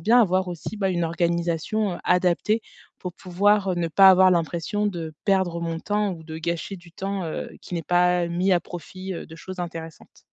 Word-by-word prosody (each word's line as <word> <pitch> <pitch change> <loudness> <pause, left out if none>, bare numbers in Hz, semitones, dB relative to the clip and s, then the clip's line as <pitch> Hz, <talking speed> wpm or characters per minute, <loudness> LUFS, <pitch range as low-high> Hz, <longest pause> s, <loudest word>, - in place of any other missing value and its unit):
bien 240 +4 +5
avoir 185 -3 +2
aussi, 175 +5 -6
bah, 195 -2 0
une 175 -2 0
organisation, 170 +4 0
heu, - - -7
adaptée 180 +5 +2 0.4
pour 180 - -6
pouvoir, 195 +2 +2
heu, - - +1
ne 170 -1 0
pas 190 +4 +7
avoir 185 0 +6
l'impression 170 +4 0
de 170 -5 -4
perdre 190 -4 +1
mon 165 -1 -2
temps 205 +2 0
ou 160 -2 -10
de 160 0 -7
gâcher 170 +4 -3
du 175 -1 -16
temps, 195 +2 -3
heu, 160 - -4
qui 180 - -7
n'est 170 - -2
pas 180 0 +3
mis 175 +3 0
à 180 - +5
profit, 185 +3 -7
heu, - - -6
de 160 - -12
choses 185 +2 -8
intéressantes. 165 -2 -8
180 Hz, 205 wpm, -24 LUFS, 170-195 Hz, 0.4 s, pas